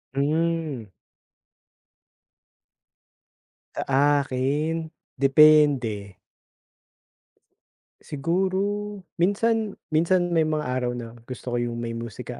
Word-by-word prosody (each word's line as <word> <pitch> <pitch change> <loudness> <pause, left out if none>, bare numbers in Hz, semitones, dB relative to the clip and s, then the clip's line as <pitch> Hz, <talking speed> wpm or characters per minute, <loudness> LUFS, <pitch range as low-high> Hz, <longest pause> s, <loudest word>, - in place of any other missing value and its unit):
Mm. 150 - -1 2.8
Sa 140 +1 +2
akin, 150 +5 -2 0.2
depende. 135 -8 +4 1.8
Siguro 180 +6 -1 0.6
minsan, 215 +3 +1 0.2
minsan 175 +2 +2
may 165 - +3
mga 155 -1 -1
araw 125 -1 -1
na 115 -1 -8
gusto 125 -1 -6
ko - - +1
yung 120 -1 -3
may 115 0 -4
musika 115 -2 -7
145 Hz, 75 wpm, -24 LUFS, 125-165 Hz, 2.8 s, depende